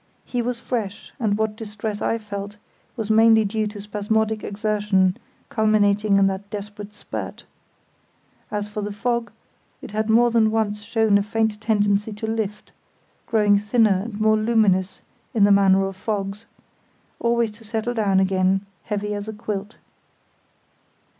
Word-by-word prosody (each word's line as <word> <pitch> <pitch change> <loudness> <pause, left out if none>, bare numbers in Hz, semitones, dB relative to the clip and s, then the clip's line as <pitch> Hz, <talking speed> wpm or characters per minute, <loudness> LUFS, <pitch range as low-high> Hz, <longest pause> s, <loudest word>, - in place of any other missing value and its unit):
He 245 - -2
was 240 0 -2
fresh, 220 -5 -4
and 210 -4 +1
what 220 -1 -1
distress 215 -1 -5
I 230 - +1
felt 205 -1 -7 0.4
was 220 -2 -2
mainly 220 0 +6
due 215 +1 -1
to 210 0 -8
spasmodic 215 +1 -1
exertion 205 -3 +1 0.3
culminating 210 -2 +3
in 195 - +5
that 195 +1 -2
desperate 205 0 -7
spurt. - - -6 1.1
As 205 0 -3
for 210 0 -5
the 205 0 -3
fog, 235 +3 -1 0.5
it - - -10
had 215 +1 -1
more 235 +2 +5
than 225 -2 +4
once 215 -1 -1
shown 220 -1 +2
a - - +1
faint 220 0 -1
tendency 210 -1 +1
to 210 +2 -5
lift, 220 -2 -3 0.6
growing 210 -3 +4
thinner 210 -2 +3
and 220 -3 -6
more 215 0 +4
luminous, 215 -4 +1 0.3
in 210 - +4
the 205 - +6
manner 195 -1 +5
of 195 0 -5
fogs, 200 +1 -4 0.7
always 235 -1 +1
to 220 +2 -17
settle 225 +2 -2
down 200 -4 +2
again, 190 0 +2 0.2
heavy 210 -1 -2
as 205 0 -5
a 220 - -4
quilt. 210 -1 -5
210 Hz, 150 wpm, -23 LUFS, 200-220 Hz, 1.1 s, mainly